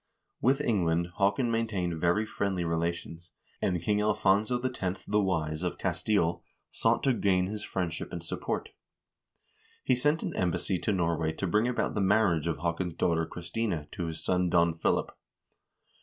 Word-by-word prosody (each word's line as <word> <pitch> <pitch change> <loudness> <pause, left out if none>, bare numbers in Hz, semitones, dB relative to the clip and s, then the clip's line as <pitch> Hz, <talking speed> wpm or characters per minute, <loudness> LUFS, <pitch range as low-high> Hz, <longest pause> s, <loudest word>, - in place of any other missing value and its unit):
With 135 +4 +3
England 85 - +1
Haakon 100 +5 +2
maintained 95 -8 -1
very 90 +5 +2
friendly 95 -4 -1
relations, 85 +1 -3 0.3
and 90 -1 +1
King 105 +2 +2
Alfonso 105 +3 +2
X., 100 -7 -3
the 105 +1 +2
Wise, 80 -5 -1
of 90 -1 -2
Castile 85 -1 0 0.3
sought - - +1
to 135 - +4
gain 95 -5 +2
his 105 +2 -5
friendship 85 -5 -3
and 85 -2 -5
support. - - -3 1.1
He - - +3
sent 150 +6 +1
an - - -3
embassy 90 +1 0
to 105 - 0
Norway 85 -4 0
to 95 - -3
bring 105 +6 +2
about 125 - 0
the 105 - 0
marriage 95 -5 +3
of 85 - -1
Haakon's 85 0 -2
daughter 80 -2 +1
Christina 85 -1 -3
to 85 - -4
his 80 0 -5
son 90 -1 +2
Don 85 -1 +3
Philip. 80 - 0
90 Hz, 155 wpm, -29 LUFS, 85-105 Hz, 1.1 s, to